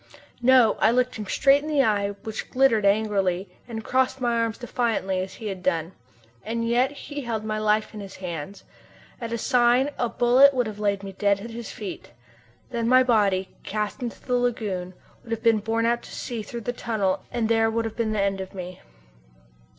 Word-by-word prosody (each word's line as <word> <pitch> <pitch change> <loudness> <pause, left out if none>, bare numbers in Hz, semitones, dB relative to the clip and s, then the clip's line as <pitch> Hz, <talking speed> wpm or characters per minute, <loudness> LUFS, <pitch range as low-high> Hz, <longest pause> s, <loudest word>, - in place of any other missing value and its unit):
No! 245 -3 +5
I - - +5
looked 250 +1 +1
him 210 -2 -6
straight 275 +7 +4
in 305 - -6
the 290 -3 +3
eyes, 205 -3 +1
which 220 -1 -5
glittered 240 -6 +3
angrily, 200 -3 +1 0.2
and 225 -2 -6
crossed 260 +2 +1
my 240 -2 +1
arms 230 -1 -1
defiantly, 230 -6 -1
as 185 +1 -5
he 225 - -10
had 195 -3 -4
done. 170 -2 0 0.5
And 230 +1 -2
yet 245 +3 +3
he 290 0 -7
held 230 -4 -3
my 215 0 -2
life 215 +1 +1
in 215 - -7
his 195 -1 -9
hands! 180 0 -6 0.6
At 230 -1 -4
a 235 - -1
sign 245 +4 +3
a 240 - +1
bullet 260 +4 +5
would 250 -1 +2
have 210 -1 -6
laid 200 -1 0
me 195 - -6
dead 200 +1 +1
at 230 +2 -7
his 230 0 -7
feet. 200 - -8 0.6
Then 235 -1 -1
my 255 +1 +6
body, 200 -6 +2
cast 210 +5 -3
into 240 -2 -5
the 250 - -4
lagoon, 205 -7 -2 0.3
would - - -16
have 225 - -4
been 225 -2 +4
borne 225 +2 0
out 235 +1 +1
to - - -13
sea 235 -3 -5
through 235 +2 -7
the 245 +2 -3
tunnel 215 -6 -1
and 235 -2 0
there 225 0 +3
would 230 +1 -1
have 220 -1 -5
been 230 -2 -1
an 205 - +1
end 195 -1 0
of 190 +1 -8
me. 180 -1 -7
225 Hz, 205 wpm, -25 LUFS, 200-240 Hz, 0.6 s, my